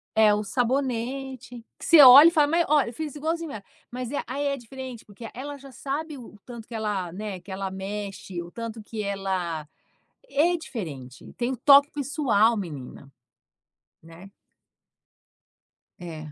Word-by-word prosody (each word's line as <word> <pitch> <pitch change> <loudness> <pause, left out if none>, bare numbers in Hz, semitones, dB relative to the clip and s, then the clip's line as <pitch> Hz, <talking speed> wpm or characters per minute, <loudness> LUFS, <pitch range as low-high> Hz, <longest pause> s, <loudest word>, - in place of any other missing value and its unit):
É 215 -1 +5
o 210 +1 -1
sabonete 250 +1 -2
que - - -9
você 330 -3 +8
olha 275 +4 +11
e - - +5
fala: 300 -3 +3
"Mas 335 +2 +2
ó, 300 0 +4
eu 235 - -4
fiz 305 +2 -6
igualzinho 325 +1 -3
ela". 210 -5 -8 0.3
Mas 250 0 -5
é 290 - -1
aí 285 0 -2
é 280 - -1
diferente, 255 -1 -9
porque 215 +2 -10
ela 285 +3 -7
já 275 0 -13
sabe 290 +4 -5
o 230 -4 -12
tanto 235 -3 -10
que 235 - -11
ela, 205 -5 -2
né, 200 0 -6
que 180 +3 -13
ela 195 0 -3
mexe 195 -1 -6
o 170 0 -10
tanto 230 0 -6
que 215 0 -5
ela 190 -6 -3 0.6
é 340 - +2
diferente, 150 - -8
tem 245 +2 -2
um - - -4
toque 280 +4 +6
pessoal 260 -6 +1
menina, 145 -7 -7 0.9
né. 165 +4 -14 1.7
É. 155 -3 -8
230 Hz, 160 wpm, -25 LUFS, 195-275 Hz, 1.7 s, olha